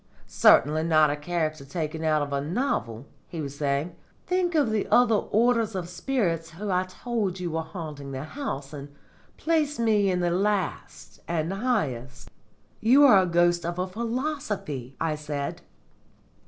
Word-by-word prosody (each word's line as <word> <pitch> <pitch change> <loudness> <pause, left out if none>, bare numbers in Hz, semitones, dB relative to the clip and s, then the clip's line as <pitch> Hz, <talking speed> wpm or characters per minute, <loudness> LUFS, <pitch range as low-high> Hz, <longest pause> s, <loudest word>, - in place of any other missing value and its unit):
"Certainly 155 +2 +4
not 155 -2 +4
a - - -1
character 155 -1 -2
taken 155 +2 -4
out 155 -2 +2
of 145 0 -5
a 140 - 0
novel," 145 - -2 0.2
he 165 - -7
was 140 -2 -5
saying. 145 +4 -1 0.3
"Think 360 -1 0
of 285 -8 +3
the 215 -2 0
other 245 -2 +5
orders 225 0 +2
of 180 -2 -3
spirits 175 -3 -1
who 195 +5 -5
I 185 0 +1
told 195 -1 -3
you 175 -2 -3
were 160 +1 -1
haunting 155 -4 -7
the 135 0 -5
house, 155 - -5
and 140 -1 -8 0.5
place 310 -3 0
me 215 -4 +2
in 180 -1 0
the 175 -1 +1
last 195 0 -2
and 165 +1 -1
highest." 130 - -2 0.5
"You 255 +6 +5
are 195 -8 +7
the - - -5
ghost 175 0 +3
of 170 +1 -3
a 180 - 0
philosophy!" 220 - -4
I 165 -1 0
said. 150 -2 -4
175 Hz, 160 wpm, -26 LUFS, 150-220 Hz, 0.5 s, are